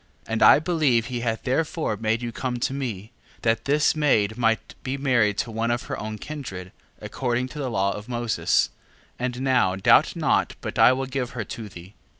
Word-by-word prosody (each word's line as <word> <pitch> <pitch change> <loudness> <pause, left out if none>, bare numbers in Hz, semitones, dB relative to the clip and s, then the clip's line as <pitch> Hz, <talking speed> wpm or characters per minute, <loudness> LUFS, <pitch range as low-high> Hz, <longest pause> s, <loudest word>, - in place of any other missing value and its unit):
7:14. - - -11
And 115 - -1
I - - +8
believe 150 -8 +1
he 125 -1 -4
hath 115 -2 -2
therefore 155 -1 -1
made 110 +2 -1
you 120 - -3
come 125 +1 -3
to 125 +2 -1
me, 115 -6 -5 0.3
that 115 0 +1
this 150 +3 +2
maid 110 -9 +2
might 115 -1 0
be 135 +1 -3
married 120 -7 +2
to 115 - -2
one 115 +1 -1
of 120 +3 -1
her 135 - -5
own 110 0 -5
kindred, 100 -11 -7 0.3
according 125 0 -2
to 150 - -8
the 135 -3 -2
law 100 -3 +1
of 105 +3 -8
Moses: 120 -2 +1 0.5
and 125 0 -3
now 125 -9 +2
doubt 95 - +4
not - - +1
but - - -5
I - - +8
will 135 +1 -1
give 130 -2 -4
her 110 - -1
to 105 +2 -7
thee. 90 +1 -12
120 Hz, 200 wpm, -24 LUFS, 110-135 Hz, 0.5 s, I